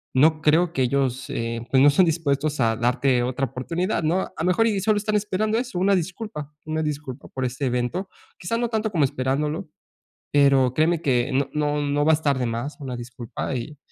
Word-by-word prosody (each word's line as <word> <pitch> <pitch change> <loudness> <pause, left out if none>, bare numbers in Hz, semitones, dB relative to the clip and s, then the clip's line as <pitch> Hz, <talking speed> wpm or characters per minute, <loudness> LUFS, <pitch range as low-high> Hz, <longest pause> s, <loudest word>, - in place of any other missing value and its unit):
No 155 +4 +4
creo 165 +3 +3
que 130 - +1
ellos, 130 0 0
eh, 115 0 -3
pues, 130 - +5
no 145 - +7
estén 160 +6 +4
dispuestos 150 -3 0
a 115 -2 +2
darte 125 +2 +1
otra 130 +2 -1
oportunidad, 165 - -2
¿no? 170 +5 +2
A - - -9
lo 160 - 0
mejor, 185 +5 +3
y 210 -3 +1
solo 215 +1 +2
están 210 +1 -1
esperando 210 +1 0
eso, 245 -7 -4
una 195 +2 +3
disculpa, 180 -4 -4
una 155 0 -2
disculpa 145 -3 -5
por 130 -1 -3
este 130 +3 -3
evento. 125 +10 -2 0.3
Quizá 230 +7 -2
no 240 - 0
tanto 220 -1 -1
como 160 -7 +3
esperándolo, 150 +6 -2 0.6
pero 135 -3 +4
créeme 160 +3 +2
que 130 -4 +1
no 135 +1 +1
no 150 0 0
no 145 0 0
va 160 - +5
a - - +6
estar 140 -4 +1
de 125 - 0
más, 120 +6 -4
una 130 -3 -5
disculpa. 120 +2 -5
Y 140 +5 -5
150 Hz, 205 wpm, -24 LUFS, 130-175 Hz, 0.6 s, no